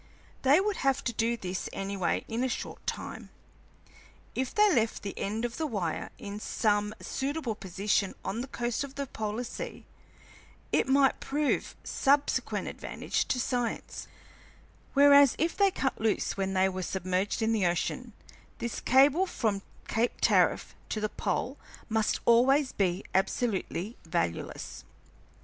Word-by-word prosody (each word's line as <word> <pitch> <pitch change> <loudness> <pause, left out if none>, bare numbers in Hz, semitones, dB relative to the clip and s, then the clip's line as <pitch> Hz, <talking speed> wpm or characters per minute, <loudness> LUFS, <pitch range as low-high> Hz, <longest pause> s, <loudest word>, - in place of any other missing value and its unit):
They 275 +5 +6
would 405 0 0
have 270 0 +1
to 235 - -1
do 230 +2 +1
this 185 -3 -4
anyway 195 -1 -1
in 230 +2 -1
a 260 - +1
short 250 - -5
time. - - -4 1.0
If 260 0 -2
they 420 -1 +4
left 230 -4 +1
the 200 - -4
end 220 +4 -2
of 235 - -4
the 320 - -1
wire 190 - -2
in 205 0 -6
some 210 -1 0
suitable 275 -3 -2
position 195 0 -1
on 225 +4 -2
the 260 - -5
coast 240 0 -2
of 280 -1 -8
the 280 - -2
polar 220 -1 -3
sea, 475 - -7 0.9
it - - +2
might 270 0 +4
prove 290 +1 -1
of - - -12
subsequent 280 +1 +1
advantage - - -2
to 250 - 0
science, 245 -1 -2 0.9
whereas 280 -1 +7
if 330 +2 0
they 400 -1 +4
cut 270 -10 -2
loose 220 -2 +1
when 195 -1 -1
they 190 0 +4
were 185 0 -3
submerged 185 +4 -1
in 225 +1 +2
the 205 -5 +2
ocean, 220 +7 -2 0.4
this 235 -1 -3
cable 285 +8 +5
from 215 - -1 0.3
Cape 230 +3 +1
Tariff - - +3 0.2
to 215 - -2
the 215 0 -1
pole 265 +6 -2 0.3
must 220 -1 +1
always 260 +4 +5
be 185 -1 0
absolutely 195 +1 -1
valueless. 165 - -3
230 Hz, 150 wpm, -29 LUFS, 200-270 Hz, 1.0 s, whereas